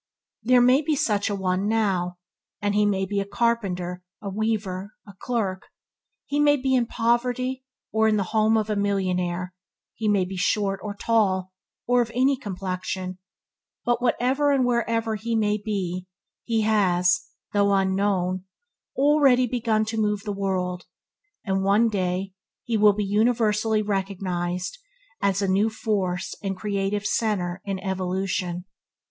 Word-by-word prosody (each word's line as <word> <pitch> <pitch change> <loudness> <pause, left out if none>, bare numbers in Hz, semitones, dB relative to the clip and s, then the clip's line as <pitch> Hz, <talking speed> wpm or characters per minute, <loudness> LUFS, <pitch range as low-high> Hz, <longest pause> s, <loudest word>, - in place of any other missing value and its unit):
There 245 +2 +5
may 255 +4 +5
be 310 0 0
such 210 -6 +1
a 205 - -1
one 190 0 0
now, 190 -5 0 0.4
and 205 -1 0
he 210 0 +3
may 195 -1 +1
be 200 +1 -1
a - - 0
carpenter, 195 -5 -1 0.2
a 200 - -5
weaver, 205 -2 -2
a 200 - -12
clerk; 200 -7 -2 0.6
he 290 - -1
may 290 0 +5
be 265 0 0
in 245 -2 +2
poverty 250 +3 0 0.3
or 220 0 +3
in 215 -1 +3
the 200 - +1
home 220 0 +4
of 215 -1 0
a - - +1
millionaire; 185 -3 -1 0.4
he 220 - -3
may 200 -3 +3
be 190 +1 -6
short 195 +1 +1
or 205 -1 -5
tall, 190 -4 +1 0.3
or 245 0 +3
of 235 - -1
any 265 +2 +3
complexion, 185 -4 -4 0.7
but 240 0 +1
whatever 260 +4 +2
and 270 -3 +3
wherever 230 -2 0
he 230 +3 -2
may 210 -1 +1
be, 185 -4 -3 0.4
he 225 -2 +1
has, 185 -4 +2 0.3
though 200 -1 +3
unknown, 190 -1 +1 0.5
already 275 -3 +4
begun 225 -3 0
to 220 0 -2
move 210 -1 0
the 205 - -3
world, 185 -2 -2 0.6
and 190 -2 0
will 190 - -1
one 210 +4 +4
day 185 -1 -2 0.3
be 220 -3 +1 0.2
universally 215 +1 +2
recognized 185 - -2 0.4
at 200 0 +1
a - - +1
new 200 +4 +3
force 195 -4 -2
and 195 -2 -3
creative 200 0 -2
centre 195 -5 0
in 195 -1 -2
evolution. 185 -1 -2
205 Hz, 150 wpm, -25 LUFS, 190-225 Hz, 0.7 s, There